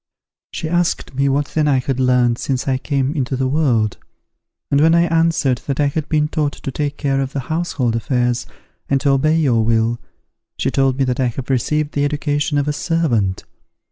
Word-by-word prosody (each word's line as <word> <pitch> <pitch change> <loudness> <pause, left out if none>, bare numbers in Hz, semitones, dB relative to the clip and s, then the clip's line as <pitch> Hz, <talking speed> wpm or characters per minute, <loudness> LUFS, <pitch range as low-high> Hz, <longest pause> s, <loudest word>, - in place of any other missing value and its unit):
She 160 - -4
asked 175 -3 0
me 140 +1 +1
what 140 +1 0
then 155 -1 0
I 140 -2 +3
had 130 0 -2
learnt, 125 -2 +2
since 130 -1 -2
I 130 -1 +1
came 135 -1 -1
into 135 -4 -2
the 130 0 0
world; 125 -7 +1 0.7
and 140 0 +3
when 165 +2 +5
I 170 - +5
answered 165 -6 +1
that 140 0 -2
I 145 - +3
had 145 +2 -2
been 150 -1 +2
taught 150 -2 -1
to 135 - -6
take 145 +1 -3
care 135 -1 0
of 135 0 -4
the 140 - -2
household 155 -6 -1
affairs, 120 +1 0 0.4
and 135 - +2
to 140 - +2
obey 155 +4 +2
your 125 -8 +2
will, 115 +1 +1 0.6
she - - -1
told 135 -1 +1
me 135 - +2
that 125 -1 -1
I 130 - +2
had 130 +3 -4
received 150 +4 0
the 145 - 0
education 145 0 0
of 145 0 0
a 150 - 0
servant. 130 - 0
140 Hz, 205 wpm, -19 LUFS, 125-150 Hz, 0.7 s, when